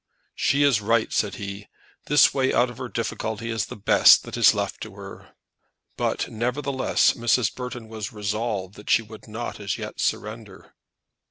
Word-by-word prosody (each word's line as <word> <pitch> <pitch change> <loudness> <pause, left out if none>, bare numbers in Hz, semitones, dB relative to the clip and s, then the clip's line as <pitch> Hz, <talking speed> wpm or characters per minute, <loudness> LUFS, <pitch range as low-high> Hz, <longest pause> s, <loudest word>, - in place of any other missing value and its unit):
"She 140 +1 +2
is 135 -7 +3
right," 115 +2 +1
said 105 - 0
he. 100 0 -7 0.4
"That 145 -1 +5
way 130 -1 +1
out 120 +1 +2
of 120 - -13
her 125 - -5
difficulty 115 0 -3
is 115 -2 -2
the - - -8
best 100 - +6
that - - -7
is - - +5
left - - -3
to - - -8
her." - - -12 0.6
But, - - -1
nevertheless, 130 +4 +1
Mrs. 120 0 +1
Burton 125 -2 -7
was 110 -3 -6
resolved 105 -2 -3
that 105 - -11
she 115 - +4
would 110 0 -13
not 115 +2 -6
as 100 -2 -3
yet - - -7
surrender. 105 -2 -4
115 Hz, 170 wpm, -24 LUFS, 105-120 Hz, 0.6 s, best